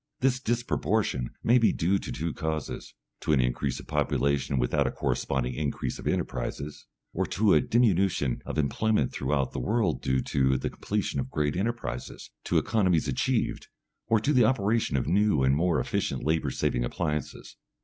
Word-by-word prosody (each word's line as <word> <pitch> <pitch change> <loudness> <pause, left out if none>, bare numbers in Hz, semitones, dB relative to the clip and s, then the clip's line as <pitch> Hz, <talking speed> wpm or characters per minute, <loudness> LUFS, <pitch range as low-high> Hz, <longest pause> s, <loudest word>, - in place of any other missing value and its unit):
This 130 -1 +2
disproportion 110 - 0
may 120 +2 +5
be 115 - +4
due 95 +4 +1
to - - -6
two 80 0 -3
causes: 80 -1 -4 0.2
to 80 - 0
an 70 - +4
increase 60 +1 0
of - - -10
population 70 -1 0
without - - +1
a - - -1
corresponding 65 -2 -1
increase 70 +2 -3
of - - -6
enterprises, 75 +1 -3 0.3
or - - 0
to 105 0 +3
a 75 - +5
diminution 95 - +2
of - - -5
employment 75 - +1
throughout 70 -3 0
the - - -4
world 105 - 0
due 65 -1 +1
to 65 -1 +2
the - - -3
completion - - -2
of 65 -1 -3
great 75 +1 -1
enterprises, 95 - -4
to - - +1
economies 95 -8 +2
achieved, 65 - -1 0.4
or 110 -1 +3
to 140 +8 +1
the 125 -3 +5
operation 110 - +1
of 65 - 0
new 100 -7 +2
and 65 +1 +4
more 85 +2 +2
efficient 110 -6 -2
labour 80 -2 +1
saving - - 0
appliances. 75 +4 -4
80 Hz, 170 wpm, -27 LUFS, 65-110 Hz, 0.4 s, may